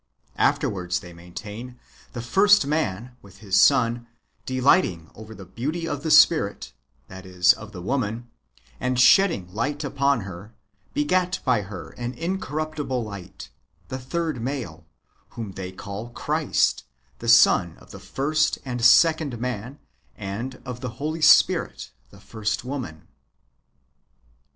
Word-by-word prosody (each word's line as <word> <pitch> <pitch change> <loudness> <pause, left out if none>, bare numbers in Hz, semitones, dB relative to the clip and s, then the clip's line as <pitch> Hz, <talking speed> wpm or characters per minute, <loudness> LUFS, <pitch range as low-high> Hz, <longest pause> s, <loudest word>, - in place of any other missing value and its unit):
Afterwards, 90 -3 0
they 90 -1 -12
maintain, 105 +8 -9 0.4
the 120 - -5
first 200 +6 +4
man, 125 -6 -2
with 100 -2 -17
his 100 -3 +2
son, 120 -3 +3 0.4
delighting 130 - +2
over 110 0 -11
the 95 -1 -11
beauty 150 - -4
of 145 -3 -3
the 160 - -3
Spirit - - +4 0.2
— 70 -1 -41
that 95 +3 -11
is, 90 -1 +4
of 105 0 -11
the 90 -4 -9
woman 120 0 -2 0.2
— 60 +1 -31
and 125 0 -1
shedding 125 - +4
light 145 +8 -2
upon 140 -2 +1
her, 95 +4 -10 0.4
begat 185 -11 +1
by 125 -5 +2
her 95 -2 -9
an 120 +1 -4
incorruptible 155 -5 -3
light, 100 -9 -10 0.4
the 130 - -4
third 155 0 -3
male, 130 0 -5 0.5
whom 110 -4 -5
they 95 0 -7
call 100 +4 -7
Christ, 120 - 0 0.2
— 60 - -39
the 115 - -3
son 95 - +5
of 65 - -17
the - - -10
first 150 +3 0
and 125 -2 -4
second 155 -1 +5
man, 125 +2 -5 0.4
and 105 +6 -6
of 125 -1 -6
the 125 - -4
Holy 155 +3 -3
Spirit, - - +4 0.2
the 100 - -17
first 110 +2 -4
woman. 125 - -6
120 Hz, 140 wpm, -24 LUFS, 100-140 Hz, 0.5 s, son